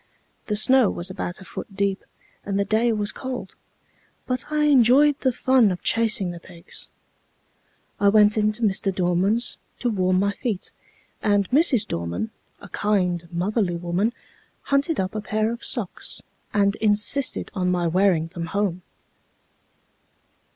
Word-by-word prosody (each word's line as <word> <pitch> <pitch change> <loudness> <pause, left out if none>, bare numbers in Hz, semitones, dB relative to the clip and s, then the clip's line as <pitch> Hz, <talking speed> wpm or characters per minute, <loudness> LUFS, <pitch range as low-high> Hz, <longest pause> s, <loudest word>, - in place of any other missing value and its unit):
The 210 - 0
snow 245 +2 +4
was 175 +2 -4
about 185 0 -4
a - - -11
foot 195 - -8
deep, 200 -1 -1 0.4
and 200 -1 -2
the 200 - +1
day 220 +3 +2
was 210 -2 -1
cold, 255 -7 -6 0.7
but 255 +3 -3
I 300 0 +1
enjoyed 280 +1 +5
the 260 - +2
fun 255 -2 +3
of 180 -2 -4
chasing 225 -5 +1
the 170 - -8
pigs. 170 -1 -9 1.1
I 200 - +5
went 210 0 +5
into 215 +1 0
Mr. 195 -1 +1
Dorman's 190 +5 0 0.2
to 245 - -1
warm 185 -3 +1
my 200 +2 +2
feet, 215 -5 -4 0.5
and 205 -2 +2
Mrs. 275 -5 +4
Dorman, 85 +5 -3 0.3
a - - -12
kind, 180 -5 0
motherly 180 +1 0
woman, 175 +6 0 0.5
hunted 280 +3 +1
up 185 -1 -1
a 215 - -3
pair 215 +1 -1
of 235 - -9
socks, 220 -8 -4 0.3
and 200 -1 +2
insisted 215 +6 0
on 185 -3 0
my 180 -1 +1
wearing 175 -1 +2
them 170 -1 -5
home. 195 -3 -1
205 Hz, 145 wpm, -23 LUFS, 185-230 Hz, 1.1 s, enjoyed